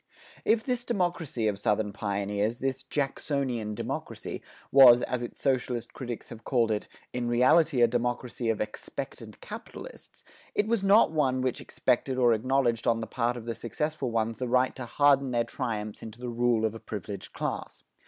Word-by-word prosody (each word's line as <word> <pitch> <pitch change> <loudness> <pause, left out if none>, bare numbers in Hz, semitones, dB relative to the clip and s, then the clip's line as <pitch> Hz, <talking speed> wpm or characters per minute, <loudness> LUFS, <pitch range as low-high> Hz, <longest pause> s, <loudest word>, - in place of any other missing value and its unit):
If 220 0 +3
this 250 -1 -1
democracy 175 - -1
of 100 -2 -1
Southern 105 -1 0
pioneers, 100 +2 -1
this 130 0 -2
Jacksonian 130 -5 -2
democracy, - - -5 0.3
was, 125 -3 +9
as 125 -1 -2
its 120 - -7
socialist 125 -3 0
critics 120 -3 -6
have 115 -1 -10
called 120 -4 +2
it, 105 -1 -2 0.3
in 125 -1 -2
reality 130 +3 +4
a - - +7
democracy 120 0 -2
of 110 - 0
"expectant 105 0 -6
capitalists," - - -10 0.3
it 205 - +2
was 225 -3 +1
not 195 -2 +6
one 135 -5 +1
which 130 -1 -1
expected 130 +1 0
or 120 -2 +5
acknowledged 120 0 +1
on 115 -1 +3
the 115 - -3
part 120 +2 -1
of 115 - -8
the 115 - -2
successful 150 +4 -3
ones 115 0 -1
the 125 - -2
right 125 +2 +2
to 130 -2 -6
harden 140 0 +4
their 120 -1 +1
triumphs 110 -5 -4
into 110 +1 -9
the 125 0 -4
rule 120 -1 +2
of 110 - 0
a 115 - -8
privileged 100 -3 -7
class. - - -4
120 Hz, 175 wpm, -28 LUFS, 115-135 Hz, 0.3 s, was